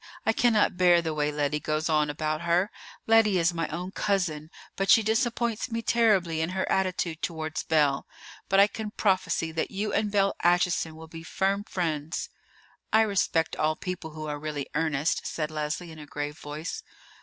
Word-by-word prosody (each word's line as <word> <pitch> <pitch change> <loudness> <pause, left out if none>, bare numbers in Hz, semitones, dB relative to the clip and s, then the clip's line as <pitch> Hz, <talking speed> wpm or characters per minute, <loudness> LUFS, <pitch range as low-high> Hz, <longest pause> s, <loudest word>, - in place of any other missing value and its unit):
I 225 - +3
cannot 220 -6 +3
bear 175 -1 +5
the 165 -2 -2
way 150 -1 0
Lettie 150 0 -1
goes 155 +1 -1
on 150 -2 +2
about 155 +1 -2
her. 170 +4 +1 0.3
Lettie 220 -3 +4
is 175 0 +2
my 165 -2 -2
own 180 +4 -5
cousin; 175 -8 -1 0.3
but 195 0 -1
she 225 - +7
disappoints 230 +1 0
me 230 0 -3
terribly 195 -10 +2
in 160 - -1
her 190 - 0
attitude 180 -3 0
towards 160 -2 -3
Belle. 145 -4 +1 0.4
But 195 - +4
I 200 - +9
can 215 +1 -5
prophesy 185 -5 0
that 160 0 -2
you 205 +2 -3
and 210 -1 +1
Belle 195 -1 +2
Acheson 175 -2 +2
will 160 0 -11
be 165 0 -9
firm 195 +4 -1
friends." 160 -5 -3 0.6
"I 220 - +5
respect 195 -6 +1
all 155 0 +1
people 180 -2 -5
who 155 0 -6
are 150 -1 -4
really 150 -2 -4
earnest," 155 -1 0
said 155 -1 -3
Leslie 155 +3 -3
in 160 - -11
a 150 - -10
grave 145 +1 -5
voice. 150 +3 -6
170 Hz, 180 wpm, -27 LUFS, 155-195 Hz, 0.6 s, I